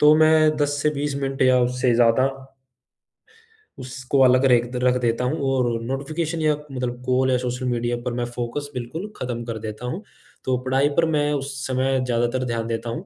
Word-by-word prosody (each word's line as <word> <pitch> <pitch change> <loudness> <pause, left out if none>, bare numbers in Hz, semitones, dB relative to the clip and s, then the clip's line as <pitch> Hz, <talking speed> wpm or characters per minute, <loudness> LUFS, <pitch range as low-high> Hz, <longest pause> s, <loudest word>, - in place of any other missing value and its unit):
तो 150 +1 +7
मैं 155 -1 +5
10 145 -1 0
से 150 - +3
20 145 0 -2
मिनट 135 0 -1
या 130 -1 +5
उससे 125 0 +1
ज़्यादा 120 +2 +4 1.5
उसको 130 +1 -2
अलग 130 +1 +5
रेख 120 -2 +4
रख 125 0 +4
देता 120 +1 0
हूँ 145 +6 -1
और 120 -3 0
नोटिफ़िकेशन 155 +6 -3
या 155 -1 +3 0.2
मतलब 125 -1 -4
कॉल 130 +1 +2
या 125 - +3
सोशल 125 +1 -3
मीडिया 120 0 0
पर 125 0 -3
मैं 120 - 0
फोकस 125 +4 -4
बिल्कुल 130 - -5
खत्म 120 -2 -4
कर 115 -1 -4
देता 110 +2 -6
हूँ, 175 - -4 0.4
तो 130 -1 +1
पढ़ाई 135 +2 +2
पर 165 - +5
मैं 145 0 +1
उस 140 0 -3
समय 130 0 +1
ज़्यादातर 120 +1 0
ध्यान 115 -2 -2
देता 115 0 -3
हूँ। 160 +10 -5
130 Hz, 190 wpm, -23 LUFS, 120-145 Hz, 1.5 s, तो